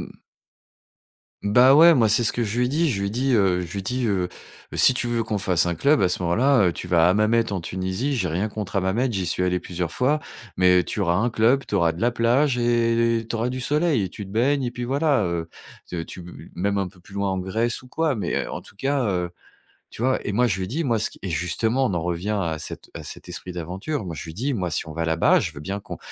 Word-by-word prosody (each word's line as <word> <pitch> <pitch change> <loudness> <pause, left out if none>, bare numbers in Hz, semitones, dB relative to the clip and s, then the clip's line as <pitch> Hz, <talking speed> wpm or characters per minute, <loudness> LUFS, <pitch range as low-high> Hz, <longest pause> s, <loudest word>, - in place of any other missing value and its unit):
mh. - - -19 1.2
Bah, 125 +6 +6
ouais, 165 +3 +8
moi, 115 -6 +4
c'est 115 +3 +3
ce - - +2
que 120 - -1
je 110 +2 -2
lui 125 - +3
ai - - -1
dit. 155 +4 +1
Je 100 -6 -2
lui 100 - -1
ai - - -4
dit, 130 +3 +1
heu, 95 -4 +3
je 85 -2 -6
lui 100 - -3
ai - - -7
dit, 125 +4 -1
heu: 95 -4 0 0.5
«Si - - +5
tu 125 - -2
veux 120 -1 0
qu'on 110 -1 -2
fasse 90 -3 +1
un 85 - 0
club, 140 - +3
à 90 - +3
ce 90 - -2
moment-là, 115 +7 +3
heu, - - -1
tu - - -7
vas 85 -1 +4
à - - +5
Hammamet 110 +2 +2
en 95 - -2
Tunisie. 95 - -2
J'ai 95 -6 0
rien 95 +7 -1
contre 105 -2 -5
Hammamet, 105 +7 +1
j'y 95 -3 -2
suis 90 +2 -1
allé 90 0 +1
plusieurs 90 -2 -4
fois, 145 +4 +1 0.4
mais 90 -1 +5
tu - - -4
auras 85 -2 +2
un 115 +5 +2
club, 120 +5 +2
tu - - -4
auras 85 -4 +3
de 85 - -9
la 120 +1 +3
plage 125 +4 +2
et 115 -1 +2
tu 115 - -2
auras 115 +2 -1
du 130 +1 -4
soleil 150 -2 +1
et - - -3
tu 105 - -8
te 95 - -12
baignes 135 +6 +1
et 120 - -1
puis 120 0 -5
voilà, 140 0 +1
heu, 85 -1 -3 0.4
c'est 85 -2 -5
tu 90 - -9
bu 85 0 -12
même 100 +3 0
un 95 -2 -1
peu 90 0 -20
plus 95 +3 -18
loin 100 -1 -1
en 95 - -1
Grèce 110 +7 -1
ou 125 - -15
quoi, 160 +2 0
mais 105 - -2
heu, - - -7
en - - -6
tout 100 - -18
cas, 135 +2 0
heu» 90 -4 -1 0.6
tu - - -10
vois? 130 +2 +2
Et 105 - -2
moi, 125 +4 +3
je 100 -4 0
lui 95 - -3
ai - - -5
dit: 150 - -2
«Moi, 115 -4 +1
ce 110 - -1
qui» - - -16
et 95 - -4
justement, 110 - 0
on 100 - -1
en 85 - -1
revient 90 +4 -2
à 80 -3 -2
cet - - -8
à - - -7
cet - - -9
esprit 90 - -6
d'aventure, 95 - -4
moi, 85 - -5
je - - -6
lui 80 - -8
ai - - -15
dit: 130 +6 -1
«Moi, 90 -5 -2
si 80 - -2
on - - -7
va 85 +1 -3
là-bas, 80 0 +3
je - - -3
veux 70 - -10
bien 95 +7 -4
qu'on - - -8
105 Hz, 285 wpm, -23 LUFS, 90-125 Hz, 1.2 s, ouais